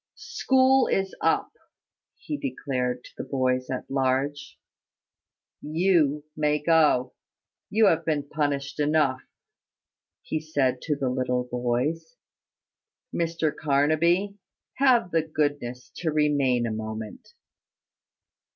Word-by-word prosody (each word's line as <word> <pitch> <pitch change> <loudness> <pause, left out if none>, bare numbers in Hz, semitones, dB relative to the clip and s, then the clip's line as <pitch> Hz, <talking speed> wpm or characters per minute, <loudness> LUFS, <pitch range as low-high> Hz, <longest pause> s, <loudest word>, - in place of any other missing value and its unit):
School 265 0 +2
is 190 0 0
up," - - +1 0.6
he 300 - -5
declared 130 - -3
to - - -14
the - - -4
boys 130 -1 -1
at 130 - -4
large. 135 +2 -1 1.0
"You 155 -2 +2
may 150 -1 +1
go 150 -5 +3 0.6
you 215 +2 +4
have 165 -4 +3
been 150 -3 -1
punished 140 -2 -2
enough," 145 -3 +2 1.0
he 155 - -2
said 140 -5 0
to 150 - -1
the 135 -2 -1
little 125 -1 0
boys. 125 - -2 1.0
"Mr 165 -2 -1
Carnaby, 160 +8 +1 0.4
have 250 -9 +3
the 165 - +3
goodness 145 -6 -3
to 165 - -1
remain 145 -5 +2
a 115 - -2
moment." 110 0 -7
145 Hz, 105 wpm, -26 LUFS, 130-165 Hz, 1.0 s, you